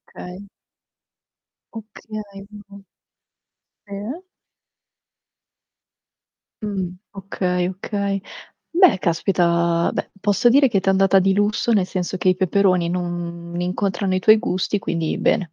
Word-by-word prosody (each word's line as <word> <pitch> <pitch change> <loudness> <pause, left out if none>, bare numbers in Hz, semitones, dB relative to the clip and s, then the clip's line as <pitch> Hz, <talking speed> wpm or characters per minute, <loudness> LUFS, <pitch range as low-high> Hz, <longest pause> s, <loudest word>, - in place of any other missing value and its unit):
Okay. 180 +2 -9 1.3
Okay, 220 0 -8 0.3
mh-mh. 200 -1 -13 1.0
Sì. 210 - -6 2.4
Mh, 190 -4 -3 0.2
okay, 180 -2 -2
okay. 200 +1 -3 0.7
Beh 370 - +7
caspita, 170 -1 +1
beh - - -4
posso 205 +3 +2
dire 275 +2 +5
che 210 -5 +1
t'è 190 - 0
andata 195 0 +4
di 190 +1 +2
lusso, 205 +4 +1
nel 200 -5 +2
senso 185 0 -3
che 185 - +2
i 185 - +3
peperoni 185 -1 +2
non 175 -1 -4
incontrano 185 +1 -1
i 185 - +1
tuoi 215 +4 +6
gusti, 205 -3 -1
quindi 165 -4 -2
bene. 180 -5 +1
190 Hz, 110 wpm, -21 LUFS, 180-205 Hz, 2.4 s, Beh